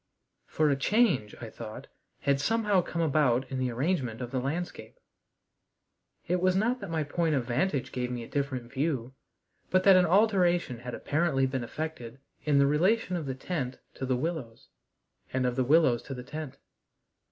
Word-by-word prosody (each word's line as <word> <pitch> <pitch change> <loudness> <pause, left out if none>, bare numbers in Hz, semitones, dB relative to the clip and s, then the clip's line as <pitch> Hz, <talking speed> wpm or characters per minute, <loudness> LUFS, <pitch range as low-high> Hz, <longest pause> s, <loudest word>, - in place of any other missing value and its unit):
For 155 -2 +2
a - - +3
change, 155 - +2
I 115 -2 -7
thought, 110 -2 -8 0.4
had 140 -1 +1
somehow 210 0 +2
come 170 -1 -2
about 135 -4 +2
in 130 - -2
the 130 -1 0
arrangement 125 -2 -1
of 125 -1 -5
the 130 - 0
landscape. 160 - -4 1.3
It 180 +1 +1
was 185 0 +3
not 235 +6 +1
that 200 - -7
my 160 -2 0
point 160 +1 0
of 130 -3 0
vantage 135 +4 -1
gave 125 -1 -2
me 120 -1 -4
a - - -9
different 130 -4 -3
view, 135 -3 -1 0.6
but 185 0 +3
that 195 -1 +8
an 180 -1 +4
alteration 175 - +3
had 125 0 -6
apparently 145 -3 +1
been 130 -1 -2
effected 130 -3 -6 0.3
in 150 -2 +3
the 140 - +5
relation 185 +7 +2
of 160 -5 -3
the 130 - -3
tent 135 -3 -3 0.2
to 130 - -5
the 130 -1 +1
willows, 130 -6 -4 0.6
and 130 -1 0
of 125 -1 0
the 130 - +2
willows 130 -3 +4
to 135 - -6
the 125 - -7
tent. 140 0 -7
140 Hz, 180 wpm, -29 LUFS, 125-175 Hz, 1.3 s, that